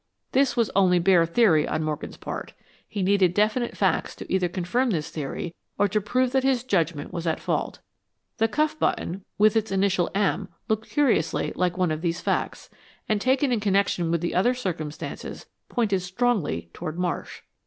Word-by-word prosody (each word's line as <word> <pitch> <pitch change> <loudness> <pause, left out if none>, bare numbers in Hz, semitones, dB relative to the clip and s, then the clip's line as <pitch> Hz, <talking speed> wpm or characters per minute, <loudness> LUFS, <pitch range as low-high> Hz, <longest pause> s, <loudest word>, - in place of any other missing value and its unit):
This 270 0 +2
was 230 -3 +2
only 185 -2 +5
bare 175 -1 +4
theory 165 -5 +4
on 155 - -1
Morgan's 155 -1 -4
part. - - -6 0.4
He 205 -3 -2
needed 185 -2 +3
definite 215 +4 +1
facts - - +1
to - - -7
either 185 -2 +2
confirm 190 +9 0
this 160 -8 -2
theory, 155 +3 -4 0.2
or 205 - +3
to 210 +2 +1
prove 250 +5 +1
that 265 0 +2
his 265 -3 +2
judgment 165 - -1
was 170 -1 -3
at 160 - 0
fault. - - -2 0.6
The 225 -1 +3
cuff 305 +5 0
button, 190 -6 -1
with 215 +1 +4
its 220 -2 0
initial 190 -2 +2
"M," 200 -1 +1 0.2
looked 220 0 -1
curiously 250 - +1
like 180 0 0
one 180 -3 +1
of 155 0 -2
these 170 -1 -1
facts, - - -2 0.4
and, 215 -2 +1
taken 260 +2 +2
in 235 - +2
connection 195 -4 +1
with 170 -1 +1
the 175 - -2
other 240 +8 +3
circumstances, 160 -10 -5 0.2
pointed 215 -6 +1
strongly 180 - -1
toward 165 -1 -5
Marsh. 180 -1 -3
195 Hz, 175 wpm, -25 LUFS, 170-230 Hz, 0.6 s, only